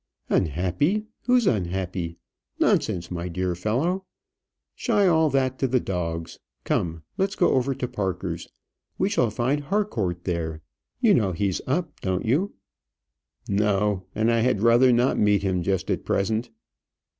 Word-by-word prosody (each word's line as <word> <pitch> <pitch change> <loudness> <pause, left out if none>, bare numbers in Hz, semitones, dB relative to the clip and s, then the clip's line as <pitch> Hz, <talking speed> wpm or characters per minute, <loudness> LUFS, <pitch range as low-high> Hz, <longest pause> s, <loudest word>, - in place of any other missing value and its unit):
"Unhappy! 95 - +1 0.2
who's 250 -2 +4
unhappy? 90 - -1 0.4
Nonsense, 85 0 +1
my 85 0 -3
dear 90 +1 -1
fellow. 130 - -1 0.7
Shy 210 -5 +1
all 160 -3 +4
that 130 -1 0
to 135 - +2
the 130 0 +2
dogs. 85 -5 -4 0.2
Come, 80 -2 -1 0.2
let's 195 +2 +1
go 175 - +3
over 135 +1 +1
to 125 -1 -3
Parker's; 95 -7 -3 0.5
we 190 - +1
shall 125 - +2
find 125 +7 0
Harcourt 115 - -1
there. 80 -3 -3 0.4
You 225 -5 +5
know 100 - +2
he's 95 +1 -1
up, 155 +3 -2
don't 95 -1 -1
you?" 150 - +1 0.9
"No; 100 -2 +1
and 110 +2 +2
I 115 - +2
had 115 -3 +1
rather 120 +2 +6
not 120 +2 +2
meet 105 -1 +3
him 95 -2 0
just 95 +1 -1
at - - -1
present." 110 +4 0
105 Hz, 145 wpm, -25 LUFS, 90-135 Hz, 0.9 s, rather